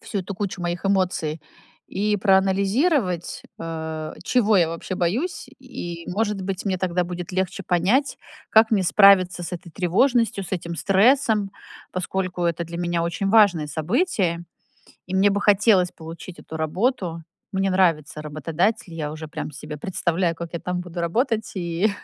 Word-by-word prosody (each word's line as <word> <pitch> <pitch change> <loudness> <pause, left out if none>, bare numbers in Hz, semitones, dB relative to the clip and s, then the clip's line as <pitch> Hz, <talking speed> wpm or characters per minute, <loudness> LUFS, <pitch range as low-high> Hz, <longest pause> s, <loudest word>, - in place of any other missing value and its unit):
всю 205 - -4
эту 185 +2 -6
кучу 195 -2 -4
моих 175 +2 -3
эмоций 180 -5 0 0.5
и 210 +1 0
проанализировать, 195 - +1 0.2
а, 160 -1 -5
чего 220 -4 +3
я 170 -3 +4
вообще 165 +3 -5
боюсь. 230 - -1
И, 170 -1 -7
может 210 0 -1
быть, 190 0 -4
мне 190 -3 -1
тогда 180 -1 0
будет 175 0 -6
легче 190 +1 -2
понять, 195 - +1 0.3
как 220 +1 +6
мне 205 -3 +3
справиться 185 -1 +5
с 175 - -6
этой 175 -1 -7
тревожностью, 205 - +1
с - - -10
этим 170 -2 -3
стрессом. 210 - +3 0.4
Поскольку 185 0 -3
это 170 0 0
для 170 +1 -7
меня 175 -1 0
очень 170 +4 -1
важное 195 -8 +5
событие 175 - 0 0.6
и 185 - -5
мне 200 +1 +4
бы 200 - 0
хотелось 200 -3 +4
получить 165 +2 -10
эту 160 - -8
работу. 170 - -1 0.3
Мне 195 0 +1
нравится 165 -5 +1
работодатель, 165 +7 -1
я 150 -2 -3
уже 155 0 -8
прям 150 - -5
себе 150 +2 -8
представляю, 170 0 -1
как 170 0 -7
я 170 - -4
там 180 0 -3
буду 175 -1 -6
работать 220 - 0
и 175 +4 0
185 Hz, 155 wpm, -23 LUFS, 170-200 Hz, 0.6 s, как